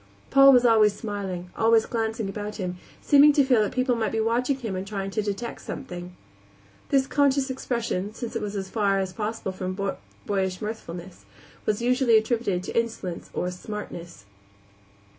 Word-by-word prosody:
Paul 275 Hz, 0 st, +8 dB
was 250 Hz, -2 st, +5 dB
always 215 Hz, -3 st, +5 dB
smiling, 190 Hz, -5 st, -5 dB
always 225 Hz, 0 st, +4 dB
glancing 225 Hz, -2 st, -2 dB
about 210 Hz, +1 st, -5 dB
him, 180 Hz, -2 st, -4 dB, 0.3 s
seeming 290 Hz, +1 st, +7 dB
to 285 Hz, -, +5 dB
feel 250 Hz, -4 st, +4 dB
that 210 Hz, -, 0 dB
people 255 Hz, 0 st, +1 dB
might 225 Hz, -3 st, -1 dB
be 225 Hz, -, -1 dB
watching 240 Hz, +5 st, +1 dB
him 225 Hz, -7 st, -4 dB
and 185 Hz, +1 st, -4 dB
trying 195 Hz, -1 st, -4 dB
to 215 Hz, -, 0 dB
detect 210 Hz, +3 st, -4 dB
something. 180 Hz, -8 st, -7 dB, 0.7 s
This 270 Hz, -1 st, +3 dB
conscious 275 Hz, -1 st, +2 dB
expression, 235 Hz, -6 st, -2 dB
since 230 Hz, +1 st, -6 dB
it -, -, -1 dB
was 210 Hz, -1 st, -4 dB
as 195 Hz, -1 st, -3 dB
far 200 Hz, -1 st, +1 dB
as 190 Hz, -1 st, -2 dB
possible 215 Hz, -1 st, -3 dB
from 185 Hz, 0 st, -5 dB, 0.5 s
boyish 190 Hz, -2 st, -1 dB
mirthfulness, 180 Hz, -, -7 dB, 0.4 s
was 215 Hz, +2 st, 0 dB
usually 250 Hz, -2 st, +4 dB
attributed 220 Hz, -5 st, 0 dB
to -, -, -6 dB
insolence 220 Hz, -7 st, -4 dB
or 180 Hz, -, -2 dB
"smartness." 175 Hz, -, -8 dB
215 Hz, 165 wpm, -25 LUFS, 190-240 Hz, 0.7 s, Paul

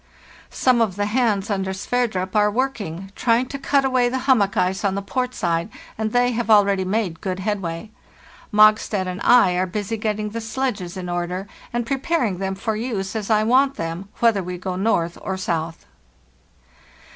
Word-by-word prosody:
"Some 250 Hz, -2 st, +2 dB
of 210 Hz, -5 st, +1 dB
the 205 Hz, 0 st, -1 dB
hands, 210 Hz, -3 st, +1 dB
under 190 Hz, -1 st, -1 dB
Sverdrup, 190 Hz, -2 st, -2 dB
are 210 Hz, 0 st, +4 dB
working, 205 Hz, -7 st, -3 dB
trying 240 Hz, +1 st, +2 dB
to 275 Hz, -, -5 dB
cut 275 Hz, 0 st, +2 dB
away 255 Hz, -2 st, +2 dB
the 260 Hz, -, -2 dB
hummock 215 Hz, -8 st, +3 dB
ice 185 Hz, +2 st, +1 dB
on 195 Hz, -1 st, +1 dB
the 200 Hz, -, -2 dB
port 250 Hz, +4 st, -2 dB
side, 170 Hz, -1 st, -1 dB, 0.3 s
and 220 Hz, 0 st, -2 dB
they 245 Hz, +1 st, +3 dB
have 235 Hz, -1 st, -2 dB
already 200 Hz, -3 st, +5 dB
made 185 Hz, -3 st, -2 dB
good 185 Hz, -2 st, -3 dB
headway. 195 Hz, -1 st, -3 dB, 0.6 s
Mogstad 215 Hz, -2 st, +4 dB
and 185 Hz, +1 st, -5 dB
I 245 Hz, -6 st, +6 dB
are 185 Hz, +1 st, +1 dB
busy 210 Hz, +4 st, -3 dB
getting 215 Hz, -1 st, -2 dB
the 230 Hz, +1 st, -4 dB
sledges 220 Hz, -6 st, -3 dB
in 180 Hz, -1 st, -5 dB
order, 175 Hz, +2 st, -3 dB, 0.2 s
and 240 Hz, 0 st, -2 dB
preparing 265 Hz, -, -1 dB
them 190 Hz, 0 st, -2 dB
for 215 Hz, +3 st, -2 dB
use 215 Hz, -3 st, -3 dB
as 215 Hz, -1 st, -3 dB
I 215 Hz, -1 st, +3 dB
want 265 Hz, +4 st, +3 dB
them, 165 Hz, +4 st, -5 dB
whether 230 Hz, -4 st, +4 dB
we 180 Hz, 0 st, -5 dB
go 185 Hz, 0 st, -4 dB
north 180 Hz, -4 st, 0 dB
or 190 Hz, 0 st, -3 dB
south. 165 Hz, -3 st, -3 dB
210 Hz, 180 wpm, -22 LUFS, 185-235 Hz, 0.6 s, I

